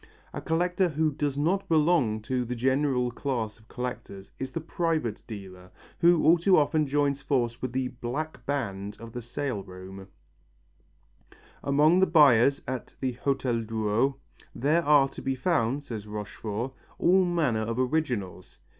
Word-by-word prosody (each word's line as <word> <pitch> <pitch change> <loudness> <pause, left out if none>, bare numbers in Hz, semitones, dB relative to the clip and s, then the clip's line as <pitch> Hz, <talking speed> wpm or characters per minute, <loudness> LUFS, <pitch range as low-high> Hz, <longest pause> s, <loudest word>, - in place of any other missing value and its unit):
A - - -5
collector 180 +3 +1
who 155 0 +1
does 145 -1 -2
not 180 +7 0
belong 150 -9 +2
to 125 +1 -1
the 125 +1 -4
general 130 0 +1
class 120 -4 -3
of 110 - -23
collectors 120 -6 -6
is 130 - -4
the 165 - -3
private 160 -7 -2
dealer, 95 -5 -9 0.3
who 170 -1 +5
all 170 +2 +6
too 185 +2 +4
often 150 0 +2
joins 140 0 +1
forces 120 -4 -1
with 130 - -3
the 130 0 -1
"black 125 +6 -5
band" 105 -8 -3
of 115 0 -9
the 120 - -5
sale 120 -2 -3
rooms. 95 +1 -10 1.6
Among 150 +5 +4
the 190 - +4
buyers 140 -4 +5
at 130 -1 -5
the 130 - -1
Hotel 125 -1 -1
Drouot, 110 +4 0 0.4
there 155 +7 +2
are 145 -2 +5
to - - -9
be 135 0 -1
found, 135 -2 0
says 110 -6 -7
Rochefort, 105 +3 -5 0.2
all 185 +2 +4
manner 160 -11 +1
of 115 +2 -3
originals. 125 - -2
130 Hz, 155 wpm, -27 LUFS, 115-155 Hz, 1.6 s, all